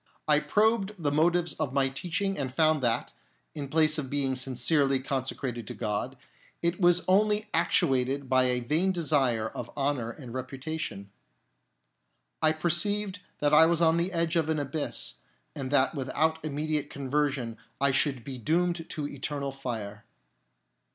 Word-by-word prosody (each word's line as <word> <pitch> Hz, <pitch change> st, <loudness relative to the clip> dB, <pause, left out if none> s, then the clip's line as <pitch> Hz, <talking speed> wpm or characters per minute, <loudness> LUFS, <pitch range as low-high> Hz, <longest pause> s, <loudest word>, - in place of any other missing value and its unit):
I 150 Hz, -1 st, +5 dB
probed 210 Hz, +6 st, +1 dB
the 150 Hz, -5 st, -1 dB
motives 170 Hz, +2 st, +2 dB
of 130 Hz, -, -2 dB
my 135 Hz, -1 st, +3 dB
teaching 175 Hz, +8 st, -2 dB
and 135 Hz, -5 st, -3 dB
found 155 Hz, +1 st, +3 dB
that, 120 Hz, -2 st, 0 dB, 0.4 s
in 145 Hz, -2 st, -5 dB
place 155 Hz, +1 st, +2 dB
of 135 Hz, -3 st, -5 dB
being 140 Hz, -1 st, +1 dB
sincerely 135 Hz, +2 st, +2 dB
consecrated 130 Hz, -3 st, -3 dB
to -, -, -6 dB
God, 115 Hz, +4 st, -3 dB, 0.5 s
it 170 Hz, +2 st, 0 dB
was 175 Hz, 0 st, +4 dB
only 210 Hz, +3 st, +2 dB
actuated 135 Hz, -3 st, +1 dB
by 130 Hz, 0 st, +4 dB
a 125 Hz, -1 st, +1 dB
vain 160 Hz, +10 st, +1 dB
desire 135 Hz, -10 st, +1 dB
of 120 Hz, -, -7 dB
honour 135 Hz, -5 st, 0 dB
and 120 Hz, 0 st, -9 dB
reputation. 130 Hz, -5 st, -5 dB, 1.3 s
I 155 Hz, -1 st, +5 dB
perceived 185 Hz, +5 st, 0 dB, 0.2 s
that 145 Hz, 0 st, +1 dB
I 160 Hz, +2 st, +8 dB
was 170 Hz, -1 st, +2 dB
on 165 Hz, -1 st, +4 dB
the 175 Hz, +3 st, 0 dB
edge 165 Hz, -1 st, 0 dB
of 160 Hz, -2 st, +1 dB
an 160 Hz, -, +1 dB
abyss, 145 Hz, -, -2 dB, 0.4 s
and 135 Hz, -3 st, -4 dB
that 135 Hz, +1 st, +3 dB
without 155 Hz, +3 st, -1 dB
an 155 Hz, -, -3 dB
immediate 150 Hz, 0 st, -2 dB
conversion 135 Hz, -4 st, -2 dB, 0.2 s
I 140 Hz, 0 st, +3 dB
should 135 Hz, -2 st, +1 dB
be 130 Hz, -1 st, -7 dB
doomed 170 Hz, +5 st, 0 dB
to 150 Hz, -2 st, -3 dB
eternal 140 Hz, 0 st, -4 dB
fire. 110 Hz, -6 st, -6 dB
145 Hz, 155 wpm, -28 LUFS, 130-165 Hz, 1.3 s, I